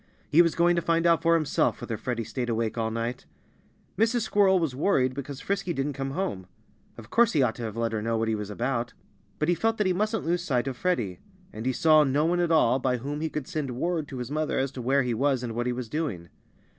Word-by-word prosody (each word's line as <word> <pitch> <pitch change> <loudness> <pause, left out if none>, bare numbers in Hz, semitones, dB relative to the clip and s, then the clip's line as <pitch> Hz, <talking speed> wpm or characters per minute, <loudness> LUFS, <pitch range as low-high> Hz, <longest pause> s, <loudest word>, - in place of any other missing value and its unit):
He 165 - +7
was 170 -2 +2
going 175 +1 +3
to 170 - +1
find 165 0 +1
out 170 -1 +4
for 165 0 +4
himself 155 -3 +1
whether 115 - -4
Freddie 115 +1 -3
stayed 120 +2 -4
awake 115 -1 -1
all 115 -1 -1
night. 115 +2 -4 0.7
Mrs. 230 +2 +2
Squirrel 200 -3 +3
was 165 -7 -1
worried 130 -5 +2
because 140 +1 -6
Frisky 195 -3 -2
didn't 140 0 -2
come 135 0 -4
home. 100 - -3 0.5
Of 115 0 -12
course 235 0 +4
he 145 -4 +3
ought 115 -3 +1
to - - -7
have 110 0 -6
let 115 -1 0
her 110 -1 -2
know 115 +1 -1
what 115 0 0
he 110 - +1
was 105 -1 -4
about. 120 +2 -2 0.4
But 155 - -1
he 175 - +4
felt 225 +5 0
that 210 - +1
he 185 - +2
mustn't 215 +1 -1
lose 170 +1 0
sight 125 -6 0
of 135 - -3
Freddie. 120 - -1 0.3
And 110 +3 -5
he - - +3
saw 155 +3 +5
no 145 +2 +1
one 175 +2 +1
at 175 -1 +1
all 135 -5 +4
by 125 -1 0
whom 145 +5 -5
he 160 - -1
could 150 -4 -5
send 145 -8 -4
word 165 0 -1
to 135 - -7
his 125 +1 -5
mother 155 +1 -1
as 135 0 0
to 130 - -7
where 135 +3 +2
he 125 -2 -1
was 130 +1 +1
and 115 -2 -4
what 120 +2 -2
he - - +1
was 125 -1 -4
doing. 110 - -3
135 Hz, 255 wpm, -27 LUFS, 120-170 Hz, 0.7 s, He